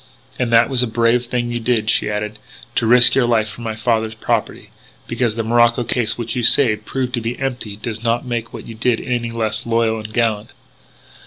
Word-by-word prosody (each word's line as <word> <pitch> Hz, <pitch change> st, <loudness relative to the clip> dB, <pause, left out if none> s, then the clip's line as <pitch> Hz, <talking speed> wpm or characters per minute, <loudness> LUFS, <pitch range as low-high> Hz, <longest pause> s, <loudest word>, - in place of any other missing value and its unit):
"And 120 Hz, -2 st, -1 dB
that 115 Hz, 0 st, +5 dB
was 130 Hz, -3 st, +1 dB
a 125 Hz, -, +1 dB
brave 115 Hz, +2 st, +1 dB
thing 120 Hz, -1 st, -2 dB
you 120 Hz, -, -2 dB
did," 115 Hz, -2 st, 0 dB
she -, -, +1 dB
added, 105 Hz, +1 st, -4 dB, 0.2 s
" 120 Hz, -, -20 dB
to 115 Hz, -, +1 dB
risk 120 Hz, +1 st, +7 dB
your 130 Hz, -3 st, +2 dB
life 110 Hz, -2 st, +1 dB
for 110 Hz, +2 st, -10 dB
my 110 Hz, -2 st, -4 dB
father's 110 Hz, 0 st, -1 dB
property. 110 Hz, -, -3 dB, 0.3 s
Because 120 Hz, -4 st, -1 dB
the 115 Hz, -, -2 dB
morocco 120 Hz, +1 st, +3 dB
case 115 Hz, -1 st, -1 dB
which 115 Hz, 0 st, -4 dB
you 125 Hz, -, -1 dB
saved 110 Hz, -3 st, +3 dB
proved 130 Hz, -2 st, -3 dB
to 120 Hz, -, -1 dB
be 115 Hz, +2 st, -4 dB
empty 125 Hz, -6 st, -4 dB
does 110 Hz, +1 st, -6 dB
not 115 Hz, +2 st, -1 dB
make 120 Hz, -2 st, -4 dB
what -, -, -9 dB
you 115 Hz, -, -9 dB
did 115 Hz, +1 st, 0 dB
any 120 Hz, -2 st, -3 dB
the 115 Hz, -, -8 dB
less 110 Hz, -1 st, -1 dB
loyal 115 Hz, -1 st, 0 dB
and 110 Hz, 0 st, -8 dB
gallant." 110 Hz, -2 st, -1 dB
115 Hz, 225 wpm, -18 LUFS, 110-120 Hz, 0.3 s, risk